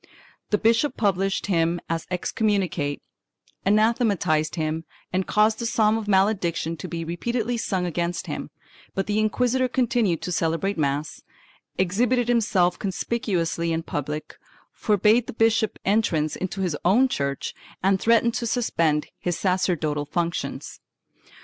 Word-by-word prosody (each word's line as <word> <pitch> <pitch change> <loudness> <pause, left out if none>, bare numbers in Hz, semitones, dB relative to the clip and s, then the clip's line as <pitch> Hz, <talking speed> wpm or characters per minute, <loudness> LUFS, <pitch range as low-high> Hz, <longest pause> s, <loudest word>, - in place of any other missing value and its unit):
The 210 - +3
bishop 230 +6 +2
published 195 -2 +1
him 170 -2 +1
as 165 0 -3
excommunicate, 180 -6 -1 0.6
anathematized 200 -8 +2
him 160 -1 -2 0.3
and 185 0 0
caused 215 +1 +3
the 235 - -1
psalm 215 -2 +3
of 220 -2 -3
malediction 190 -5 +1
to 185 - -6
be 165 -1 -4
repeatedly 235 +8 -2
sung 190 -5 -1
against 170 0 -2
him, - - -5 0.5
but 195 - 0
the 210 +1 0
inquisitor 250 +4 +1
continued 240 - +1
to 180 - -3
celebrate 170 +4 0
mass, 145 0 -2 0.6
exhibited 240 +7 +1
himself 200 -7 +2
conspicuously 185 -5 -1
in 165 0 -1
public, 150 0 -5 0.3
forbade 215 +3 +3
the - - -6
bishop 225 -1 +2
entrance 180 -7 +1
into 190 +1 -4
his 180 -5 0
own 225 +9 +4
church 140 - -2 0.3
and 195 0 +3
threatened 230 0 +3
to 240 -1 -2
suspend 165 - +1
his 175 -2 -2
sacerdotal 170 -6 0
functions. 170 +2 -3
190 Hz, 130 wpm, -24 LUFS, 165-225 Hz, 0.6 s, own